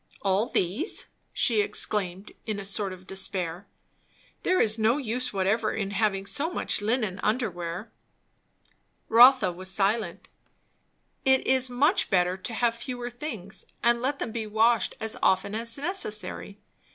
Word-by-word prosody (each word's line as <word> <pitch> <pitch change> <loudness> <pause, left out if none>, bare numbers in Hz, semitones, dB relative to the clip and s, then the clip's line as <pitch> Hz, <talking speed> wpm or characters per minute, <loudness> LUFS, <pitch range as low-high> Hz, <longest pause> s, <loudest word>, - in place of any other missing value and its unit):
"All 195 +4 +2
these!" 210 - -1 0.3
she 225 -4 +2
exclaimed 195 -2 -1 0.2
in 215 -2 -2
a 200 - -6
sort 200 0 0
of 185 0 -11
despair. 185 -1 -3 0.7
"There 370 - +2
is 220 0 +2
no 220 +4 +3
use 250 -2 -3
whatever 200 +3 0
in 200 -2 -3
having 195 -1 0
so 290 +10 0
much 350 - -1
linen 215 -3 -1
under 220 0 0
wear." 175 +4 -6 1.2
Rotha 240 -3 +7
was 185 +2 -7
silent. 210 +3 -1 1.0
"It 265 -2 +3
is 260 -1 +3
much 290 +10 +2
better 180 -1 +2
to 190 +5 -6
have 235 0 +2
fewer 245 +1 -6
things, 225 - -6 0.2
and 235 0 +3
let 275 +3 -1
them 230 - -4
be 220 -1 -4
washed 220 +1 +2
as 220 0 -2
often 190 +2 +2
as 230 +2 0
necessary. 245 - -2
215 Hz, 145 wpm, -27 LUFS, 195-245 Hz, 1.2 s, Rotha